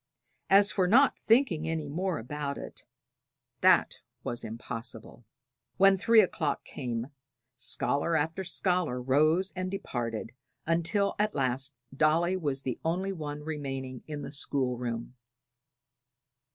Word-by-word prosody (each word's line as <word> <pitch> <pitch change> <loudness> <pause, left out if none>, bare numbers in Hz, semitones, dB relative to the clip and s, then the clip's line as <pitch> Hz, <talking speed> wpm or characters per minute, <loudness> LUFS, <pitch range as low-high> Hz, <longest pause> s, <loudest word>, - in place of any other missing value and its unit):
As 200 +1 +6
for 185 -2 +2
not 265 +8 +5
thinking 220 - +3
any 160 -2 -2
more 175 +4 -1
about 140 +4 -4
it - - -8 0.7
that - - +4 0.2
was 120 - -3
impossible. 115 0 -6 0.5
When 195 +1 +6
three 225 +3 +6
o'clock 155 -7 -1
came, 120 0 -4 0.4
scholar 140 +6 0
after 160 +4 0
scholar 175 -6 0
rose 155 +9 +2
and 185 0 -2
departed, 120 - -4 0.3
until 170 +5 +1
at 210 0 +1
last 130 0 -1 0.2
Dolly 165 +5 +3
was 145 -6 -2
the 130 - -3
only 185 +4 0
one 150 -3 -5
remaining 135 -4 -4
in 150 -2 -5
the - - -6
school 135 -3 -1
room. 120 0 -4
150 Hz, 125 wpm, -29 LUFS, 130-185 Hz, 0.7 s, As